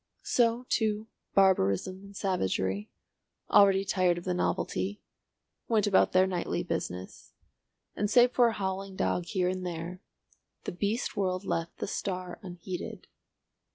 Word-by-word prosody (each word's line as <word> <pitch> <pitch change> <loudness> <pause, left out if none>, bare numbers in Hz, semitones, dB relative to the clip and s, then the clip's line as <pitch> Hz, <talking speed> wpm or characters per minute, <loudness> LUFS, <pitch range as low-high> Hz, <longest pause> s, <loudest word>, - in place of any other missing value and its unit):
So, 240 0 +2
too, 215 -1 0 0.3
barbarism 185 - +3
and 200 0 -13
savagery, 100 - -1 0.6
already 195 -1 +6
tired 185 -2 +2
of 175 - -6
the 180 - -1
novelty, 190 +2 -1 0.7
went 220 -3 +3
about 200 -2 +4
their 185 0 +5
nightly 180 -2 -2
business, 90 +1 -5 0.6
and 205 - 0
save 245 +2 +6
for 245 -1 +5
a 230 - 0
howling 195 -1 -3
dog 180 -1 0
here 185 -3 0
and 185 0 -2
there, 175 +1 -5 0.6
the - - -3
beast 205 +8 -2
world 185 -1 -1
left 165 -3 -2
the - - -3
star 185 -2 -4
unheeded. 180 -1 -7
190 Hz, 135 wpm, -29 LUFS, 180-205 Hz, 0.7 s, already